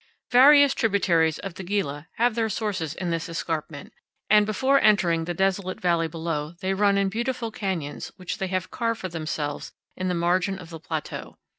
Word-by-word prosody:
Various 280 +2 +7
tributaries 175 -7 +2
of 195 -3 -6
the 190 - -8
Gila 175 -6 -2
have 240 +1 +2
their 225 -1 0
sources 190 -8 -2
in 180 -2 -3
this 165 +1 -2
escarpment, 160 -3 -4 0.4
and 210 -1 +6
before 265 +6 +2
entering 175 -6 +3
the 175 +1 -3
desolate 190 0 0
valley 170 -2 +1
below 160 -1 -4
they 190 -1 -1
run 200 0 +3
in 200 0 +2
beautiful 235 +2 -2
canyons 180 -9 -4
which 185 -2 -5
they 190 - -1
have 185 0 -3
carved 230 -1 -1
for 185 - -4
themselves 155 -3 -4 0.2
in 185 - -3
the 180 - 0
margin 180 +3 +1
of 175 -3 -11
the 165 - -7
plateau. 160 -1 -6
185 Hz, 180 wpm, -25 LUFS, 165-210 Hz, 0.4 s, Various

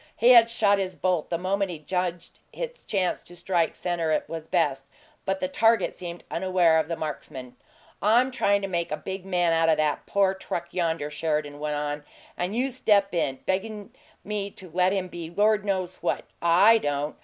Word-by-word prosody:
He 235 - +4
had 235 -2 +8
shot 205 -3 +2
his 185 -1 -3
bolt 180 -4 0
the 170 - 0
moment 195 +2 -1
he 170 - -5
judged 175 +2 -4
its - - -7
chance 190 -3 0
to 175 - -11
strike 175 -2 0
center 165 -3 0
was 160 -1 -6
best, 140 -6 0 0.4
but 195 0 -1
the 185 - -1
target 225 +2 +2
seemed 175 -1 -7
unaware 175 -2 +3
of 160 - -1
the 165 - -2
marksman. 135 -5 -6 0.5
"I'm 240 +5 +4
tryin' 200 -5 +1
to - - -1
make 170 -4 -2
a 150 - -1
big 190 0 -6
man 175 -3 +2
out 165 0 +3
o' 160 - +5
that 150 -1 -1
poor 195 -1 +2
truck 175 -2 -5
yonder," 165 -4 -1
Sheridan 150 -1 -2
went 150 0 -2
on, 145 0 -3 0.3
"and 180 +4 -3
you 260 +3 0
step 205 -5 +2
in, 135 -6 -1
beggin' 210 +3 -3 0.3
me 205 -1 -3
to 185 -3 -12
let 180 +2 +2
him 190 -2 -1
be 170 -2 -7
Lord 210 +3 +2
knows 185 -2 -2
what - - -2 0.2
I 185 +7 +6
don't! 145 -2 -2
180 Hz, 190 wpm, -26 LUFS, 160-200 Hz, 0.5 s, had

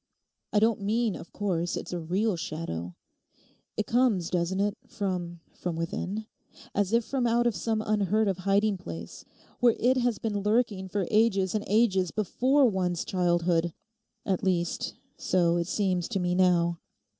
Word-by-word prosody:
I - - +1
don't 220 0 +3
mean, 220 +1 0
of - - -10
course, 175 -4 -1
it's - - -6
a 175 - -2
real 190 +6 0
shadow. 120 - -5 0.8
It 215 - 0
comes, 230 -8 +2
doesn't 180 +1 0
it, 205 +1 +1
from—from 180 -5 -4
within? 180 +6 -3 0.5
As 205 -1 0
if 230 0 +2
from 260 -3 0
out 235 +1 +2
of 235 -3 +2
some 215 +5 -1
unheard 215 0 +2
of 190 -2 -1
hiding 200 +2 +2
place, 85 - -8 0.3
where 240 -2 +4
it 255 +2 +3
has 240 -3 +1
been 210 -1 -2
lurking 210 -2 +1
for 195 0 -1
ages 210 -4 +3
and 215 -1 -1
ages 195 -4 +3
before 260 - +2
one's 180 -5 -1
childhood; 175 -2 +1 0.5
at 190 -3 0
least, 175 -3 -1 0.2
so 175 -2 +2
it 170 -1 -1
seems 185 -3 0
to 205 -5 -2
me 180 0 0
now. 175 -2 +3
195 Hz, 155 wpm, -28 LUFS, 175-220 Hz, 0.8 s, where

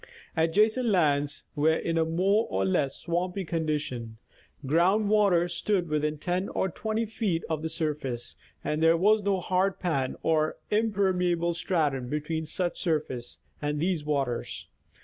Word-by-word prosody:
Adjacent 210 +10 +3
lands 145 -7 +1
were 155 +2 +3
in 165 0 -2
a 165 - +3
more 190 +7 +2
or 95 0 0
less 135 +8 +1
swampy 180 +3 -2
condition; 150 -9 -3 0.5
ground 185 +9 +3
waters 185 -5 +3
stood 180 -1 0
within 150 0 0
10 180 +5 -2
or 190 - -1
20 220 +5 -2
feet 210 -6 -1
of 160 -2 -2
the 160 - -3
surface, 150 -7 -3 0.3
and 150 +1 -1
there 165 +1 +5
was 210 +5 +4
no 200 -1 +1
hard 185 +2 0
pan 140 -7 -1
or 155 -1 +1
impermeable 185 -5 +1
stratum 150 -8 0
between 155 +2 -2
such 175 +2 -2
surface 150 -8 -2 0.2
and 150 0 -1
these 170 -1 0
waters. 140 -5 -2
165 Hz, 145 wpm, -28 LUFS, 150-190 Hz, 0.5 s, there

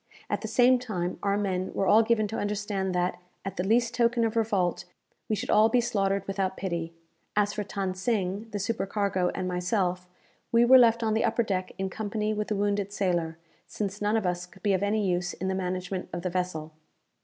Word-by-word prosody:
At - - 0
the 220 - -4
same 245 +3 +5
time 185 -8 -3
our 200 0 +1
men 190 -2 -1
were 195 - +1
all 215 +3 +6
given 220 -1 +2
to 225 - -3
understand 205 -2 -2
that, 180 0 0 0.3
at 195 - -5
the 180 - 0
least 230 +4 +2
token 235 0 +2
of 225 0 -2
revolt, 195 -6 0 0.4
we 215 - +2
should - - -3
all 215 +1 +6
be 245 - +3
slaughtered 200 -5 0
without 195 -1 -1
pity. 170 -3 -3 0.4
As 205 -1 +2
for 210 0 -2
Than 195 -2 -3
Sing, 200 +1 -1
the 210 - -4
supercargo, 195 -2 0
and 185 -1 -2
myself, 180 0 -1 0.4
we 235 0 +5
were 260 +2 +8
left 230 -1 +4
on 220 -1 +1
the 220 - +1
upper 235 - +2
deck 185 -4 -2
in 190 - -1
company 215 0 -2
with 210 0 -2
the 210 - -1
wounded 200 0 0
sailor, 175 -5 -1 0.3
since 205 -1 -4
none 210 +2 +2
of 215 - -1
us 180 0 -1
could 185 +1 -19
be 205 - +3
of 190 - +1
use 195 -4 0
in 190 - -3
the - - 0
management 185 0 -3
of 175 0 -5
the 180 - -2
vessel. 175 -4 -3
200 Hz, 210 wpm, -28 LUFS, 185-215 Hz, 0.4 s, were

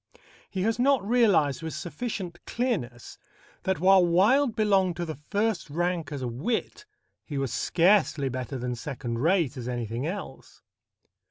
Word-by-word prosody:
He 190 -2 -2
has 225 +2 0
not 255 -5 +3
realized 200 - +3
with 160 -1 -5
sufficient 180 -3 -5
clearness 165 - -3 0.4
that, 190 -4 -1
while 190 +1 +6
Wilde 215 +10 +3
belonged 195 -5 +2
to 175 +1 -3
the 155 -4 -6
first 205 -6 0
rank 170 0 -1
as 140 -3 -4
a - - -1
wit, 225 - -3 0.4
he 145 - -6
was 135 -3 -2
scarcely 175 -5 +2
better 130 +1 -4
than 125 0 -3
second 120 -2 -5
rate 160 -2 +1
as 125 -1 -5
anything 120 +2 -3
else. 180 -7 -8
175 Hz, 150 wpm, -27 LUFS, 135-205 Hz, 0.4 s, while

